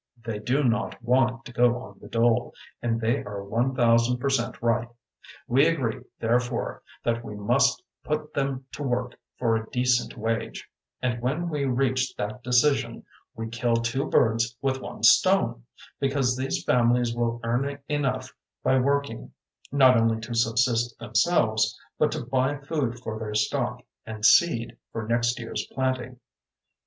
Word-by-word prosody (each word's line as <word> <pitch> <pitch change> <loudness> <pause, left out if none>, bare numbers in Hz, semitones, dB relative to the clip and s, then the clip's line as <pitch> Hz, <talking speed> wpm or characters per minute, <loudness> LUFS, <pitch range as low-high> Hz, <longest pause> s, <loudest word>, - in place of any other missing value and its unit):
They 110 -3 -3
do 130 +7 0
not 115 -3 0
want 125 0 +2
to 120 - -10
go 120 0 +3
on 130 - -12
the - - -12
dole 115 0 +1 0.3
and 115 -1 0
they 115 +4 0
are 100 -1 -6
one 120 +6 -1
thousand 120 0 +3
percent 130 -2 -1
right. 120 0 +1 0.6
We 135 +5 +4
agree, 130 -7 -1 0.2
therefore, 120 +1 -1 0.2
that 120 0 0
we 105 - -7
must 120 +7 +2 0.2
put 150 0 -3
them 135 -1 -2
to - - -8
work 125 -2 -2 0.2
for 115 -2 +1
a 110 0 -3
decent 125 0 +1
wage; 115 +1 -3 0.4
and 120 -2 -1
when 155 +8 -1
we 150 -3 -1
reach 130 0 0
that 105 +4 -4
decision 125 +4 +2 0.3
we 115 0 -4
kill 115 +1 0
two 120 +5 -1
birds 115 0 +2
with 135 -1 -1
one - - -8
stone, - - +4 0.3
because 135 -2 +1
these 130 +1 -2
families 120 -1 +2
will 120 0 -1
earn 135 +5 -1
enough 145 -3 -1 0.3
by 130 0 +3
working, 140 - -1 0.4
not 130 -4 +6
only 115 0 +2
to 115 +2 -6
subsist 115 +1 +1
themselves, 110 -4 +1 0.2
but - - +3
to - - -4
buy 130 +2 0
food 140 -4 -2
for 110 -3 -5
their 105 -1 -5
stock, 105 0 -1 0.2
and 110 -1 -5
seed 120 -7 +4
for 110 -1 -5
next 120 +1 +1
year's 115 -1 -4
planting. 130 -2 -2
120 Hz, 155 wpm, -26 LUFS, 115-130 Hz, 0.6 s, not